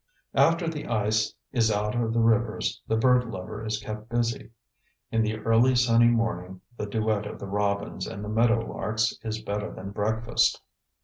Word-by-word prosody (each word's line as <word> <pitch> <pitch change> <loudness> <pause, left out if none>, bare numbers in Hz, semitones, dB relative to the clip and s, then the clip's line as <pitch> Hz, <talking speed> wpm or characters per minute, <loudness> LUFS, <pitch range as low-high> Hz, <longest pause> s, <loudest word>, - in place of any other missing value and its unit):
After 165 +1 +3
the 160 -2 -4
ice 110 -1 +1 0.2
is 115 -4 +2
out 105 0 0
of 120 -2 0
the 115 0 +2
rivers 115 -1 +1
the 110 - +1
bird 125 +1 +4
lover 105 +2 -6
is 110 -1 -1
kept 110 +1 -7
busy. 120 -1 -1 0.6
In 115 - +2
the 110 0 0
early 115 +4 +3
sunny 120 -1 +5
morning 95 -6 0 0.2
the 105 - -4
duet 110 0 0
of - - -7
the - - -7
robins 100 -1 -1
and 100 +2 -6
the - - -6
meadow 115 +2 +3
larks 110 +2 -1
is 110 0 -4
better 105 0 -3
than 95 +1 -8
breakfast. 110 +3 +1
110 Hz, 175 wpm, -27 LUFS, 105-115 Hz, 0.6 s, sunny